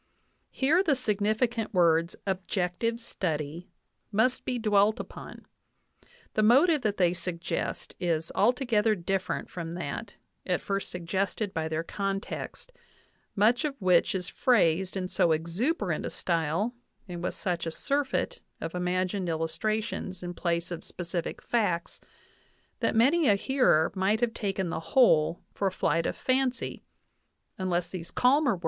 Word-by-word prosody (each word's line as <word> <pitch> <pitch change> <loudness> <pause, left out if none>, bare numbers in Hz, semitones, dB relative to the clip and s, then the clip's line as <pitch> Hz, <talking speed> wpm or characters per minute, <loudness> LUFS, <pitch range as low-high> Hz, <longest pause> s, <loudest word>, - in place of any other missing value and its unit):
Here 305 +7 +3
the 315 -7 +2
significant 220 0 0
words, 170 -1 +3
"objective 190 +3 -1
study," 165 -6 -4 0.4
must 225 +5 +2
be 250 - -1
dwelt 210 -1 +3
upon; - - -9 0.9
the 215 - +2
motive 280 +8 +5
that 210 -3 0
they 175 -2 +3
suggest 170 -1 -4
is 165 -2 -1
altogether 230 -4 +2
different 190 +1 -2
from 170 -1 -6
that 180 +6 -5 0.3
at 180 -1 0
first 195 0 -3
suggested 190 +3 -2
by 160 -1 -1
their 160 +1 -2
context, 195 - -4 0.6
much 225 +4 +3
of 280 -3 -3
which 185 -1 +3
is 180 -2 -3
phrased 190 - +2
in 185 -1 -2
so 170 -2 +3
exuberant 175 - -1
a - - -2
style 170 +7 -1 0.3
and 175 -2 -6
with 180 - -2
such 175 -2 -2
a - - -2
surfeit 280 - -1 0.2
of 165 - -5
imagined 180 +1 -1
illustra 165 +7 -1
tions 190 -4 -6
in 175 0 -4
place 170 0 -1
of 170 - -5
specific 175 -1 -5
facts 190 -8 -1 0.8
that - - 0
many 280 +8 +4
a 205 - +6
hearer 200 - +3
might 195 +3 +1
have 235 -1 +1
taken 195 -5 -2
the 160 - -2
whole 165 -5 +3
for 200 - 0
a - - 0
flight 165 -2 +1
of - - -2
fancy 255 -1 -1 0.8
unless 180 -2 0
these 170 -2 -7
calmer 280 +2 +3
words. 185 - -5
190 Hz, 140 wpm, -28 LUFS, 170-230 Hz, 0.9 s, a